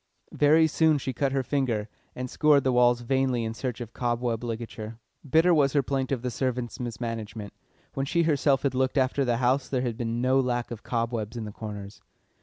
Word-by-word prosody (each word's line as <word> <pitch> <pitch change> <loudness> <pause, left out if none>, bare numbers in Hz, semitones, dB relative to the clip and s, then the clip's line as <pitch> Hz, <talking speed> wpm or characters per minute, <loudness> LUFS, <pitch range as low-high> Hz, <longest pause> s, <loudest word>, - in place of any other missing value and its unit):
Very 155 +2 +5
soon 160 0 +3
she 130 -1 -3
cut 135 +2 0
her 135 -1 0
finger, 125 -6 -1 0.3
and 125 0 -4
scoured 145 +1 +3
the 130 - +2
walls 120 -1 +4
vainly 130 -1 +1
in 110 0 -3
search 125 0 -4
of 120 -1 -7
cobweb 120 -1 -1
ligature. 115 -1 -5 0.3
Bitter 165 +5 +5
was 140 -4 +3
her 140 -2 +3
plaint 135 0 -2
of 130 -3 -1
the 125 - -2
servant's 125 0 -2
mismanagement; 115 -3 -5 0.4
when 135 0 -2
she 170 +3 +2
herself 145 -3 +2
had 140 -3 +1
looked 130 +2 0
after 130 +1 +2
the 120 -2 +1
house 130 +2 +1
there 130 -2 0
had 120 -3 -2
been 115 -1 -2
no 130 +2 +3
lack 120 -2 -1
of 115 -2 -6
cobwebs 115 -1 -2
in 115 - -4
the 105 - -6
corners. 105 -2 -8
125 Hz, 205 wpm, -27 LUFS, 115-135 Hz, 0.4 s, Very